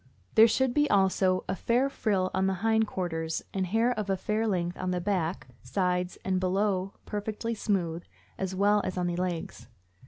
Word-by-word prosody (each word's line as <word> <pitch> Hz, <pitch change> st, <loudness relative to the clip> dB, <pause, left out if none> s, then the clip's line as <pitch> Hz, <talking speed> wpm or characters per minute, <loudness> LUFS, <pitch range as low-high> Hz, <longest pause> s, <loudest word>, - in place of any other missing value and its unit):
There 220 Hz, +1 st, +8 dB
should 255 Hz, +2 st, +1 dB
be 295 Hz, +1 st, +2 dB
also 190 Hz, -1 st, +3 dB
a -, -, -1 dB
fair 240 Hz, +7 st, +1 dB
frill 200 Hz, -8 st, 0 dB
on 190 Hz, 0 st, +1 dB
the 190 Hz, -, 0 dB
hind 220 Hz, -1 st, +3 dB
quarters 165 Hz, -4 st, -3 dB
and 190 Hz, -1 st, -1 dB
hair 225 Hz, +6 st, +2 dB
of 215 Hz, -4 st, -3 dB
a 195 Hz, -, +1 dB
fair 215 Hz, +4 st, -1 dB
length 175 Hz, -3 st, -1 dB
on 185 Hz, -, -2 dB
the 180 Hz, 0 st, 0 dB
back, 180 Hz, -2 st, -2 dB
sides 180 Hz, -2 st, -1 dB
and 185 Hz, -1 st, +1 dB
below 190 Hz, +1 st, 0 dB
perfectly 215 Hz, +2 st, -3 dB
smooth, 175 Hz, -6 st, -1 dB, 0.3 s
as 190 Hz, -1 st, -3 dB
well 205 Hz, +2 st, +3 dB
as 185 Hz, -, -3 dB
on 180 Hz, -, 0 dB
the 175 Hz, -1 st, -1 dB
legs. 180 Hz, -2 st, -4 dB
190 Hz, 185 wpm, -28 LUFS, 180-215 Hz, 0.3 s, There